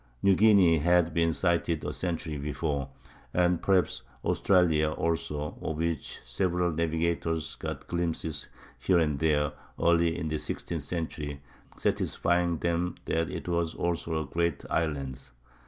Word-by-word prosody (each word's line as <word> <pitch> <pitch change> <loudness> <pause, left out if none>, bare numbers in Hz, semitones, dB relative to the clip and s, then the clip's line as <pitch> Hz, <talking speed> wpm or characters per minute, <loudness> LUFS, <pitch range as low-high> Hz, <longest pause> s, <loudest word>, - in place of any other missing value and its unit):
New 100 - +6
Guinea 95 -5 +6
had 85 +1 +3
been 85 0 +3
sighted 85 -1 0
a - - -2
century 85 -3 -3
before, 70 -1 -2 0.5
and 90 -1 +3
perhaps 95 -10 +2 0.2
Australia 80 -5 +3
also, 75 -2 -2
of 80 - -3
which 85 -2 -3
several 90 +7 0
navigators 80 0 -1
got - - -5
glimpses 85 -3 -2 0.3
here 95 - +3
and 75 -4 +1
there 75 -2 +2 0.3
early 85 0 +3
in 80 - -3
the 75 0 -1
sixteenth 85 -3 -4
century, 75 -2 -4 0.4
satisfying 85 -1 +1
them 85 +2 -1
that 80 0 0
it - - -6
also 85 -2 -1
was 85 -1 -1
a 80 -3 -1
great 85 -4 0
island. 70 -5 -1
85 Hz, 135 wpm, -29 LUFS, 75-85 Hz, 0.5 s, New